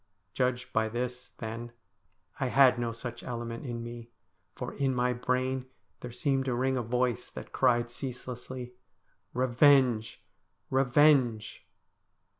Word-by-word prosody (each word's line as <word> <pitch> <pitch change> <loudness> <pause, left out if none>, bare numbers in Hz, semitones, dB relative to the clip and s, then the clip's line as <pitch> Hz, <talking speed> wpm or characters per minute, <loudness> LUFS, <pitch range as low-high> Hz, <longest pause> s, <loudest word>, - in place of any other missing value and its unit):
Judged 125 -1 -1
by 110 0 +2
this, 125 +2 -4
then, 115 +1 -6 0.7
I 135 - +1
had 130 -1 +5
no 120 -1 -1
such 120 +1 -7
element 115 +1 -5
in 115 -1 -4
me, 120 0 -8 0.5
for 125 - -5
in 135 -2 0
my 125 0 +2
brain 130 +1 -1 0.3
there 125 - -7
seemed 135 +2 0
to 125 -2 0
ring 130 +2 +1
a 125 - 0
voice 125 0 -1
that - - -9
cried 120 -1 +2
ceaselessly, 125 -1 -6 0.3
' - - -43
Revenge! 125 -3 +3 0.5
revenge 130 -4 +3
125 Hz, 130 wpm, -30 LUFS, 120-130 Hz, 0.7 s, had